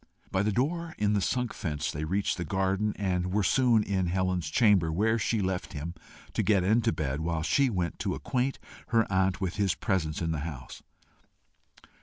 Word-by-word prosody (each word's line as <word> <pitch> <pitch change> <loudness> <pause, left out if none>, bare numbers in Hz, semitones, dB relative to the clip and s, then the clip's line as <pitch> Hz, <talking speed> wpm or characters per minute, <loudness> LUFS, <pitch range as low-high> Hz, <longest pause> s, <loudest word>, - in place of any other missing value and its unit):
By 95 - +1
the 105 +1 +1
door 160 - -1
in 105 0 +1
the 100 - +2
sunk 125 +4 -1
fence 75 -5 -3
they 75 +2 -4
reached 95 +6 0
the 90 - -2
garden, 95 +4 0
and 90 -2 -1
were 105 +1 +1
soon 120 +1 +4
in 95 -3 0
Helen's 90 -3 0
chamber, 95 -4 +4
where 110 +7 +2
she 110 0 0
left 95 +1 -2
him 80 +2 -5 0.4
to - - +1
get 100 -4 +3
into 110 +5 +3
bed 75 -2 -2
while 80 -1 -1
she 140 - +3
went 90 -6 -2
to - - -1
acquaint 130 +1 -1 0.3
her 115 -2 +3
aunt 95 0 +2
of 95 -2 -2
his 100 -3 +1
presence 80 -6 -1
in 80 -1 -1
the 80 - -2
house. 70 -5 -7
95 Hz, 190 wpm, -29 LUFS, 85-105 Hz, 0.4 s, soon